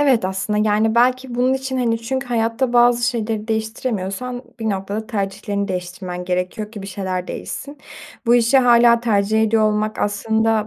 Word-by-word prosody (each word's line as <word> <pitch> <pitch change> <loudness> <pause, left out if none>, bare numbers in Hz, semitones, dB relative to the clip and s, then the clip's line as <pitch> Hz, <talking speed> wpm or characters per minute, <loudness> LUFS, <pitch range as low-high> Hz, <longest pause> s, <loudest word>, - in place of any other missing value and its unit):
Evet 265 -8 +3
aslında, 210 +3 0
yani, 220 +2 +2
belki 250 +1 +2
bunun 250 +2 +2
için, 265 0 -3
hani, 230 -2 +1
çünkü 265 +3 -3
hayatta 235 +1 0
bazı 240 0 +4
şeyleri 225 -2 -3
değiştiremiyorsan 220 +1 -3 0.2
bir 220 - 0
noktada 200 +3 -3
tercihlerini 200 -1 -3
değiştirmen 180 0 -5
gerekiyor 180 +4 -3
ki 210 -3 -8
bir 195 - -7
şeyler 185 -2 -4
değişsin. 285 +1 -7 0.5
Bu 235 - +5
işi 240 +3 +4
hâlâ 235 -2 +5
tercih 220 -1 +2
ediyor 220 0 +2
olmak 215 0 0
aslında 220 +1 +1
220 Hz, 160 wpm, -20 LUFS, 200-240 Hz, 0.5 s, Bu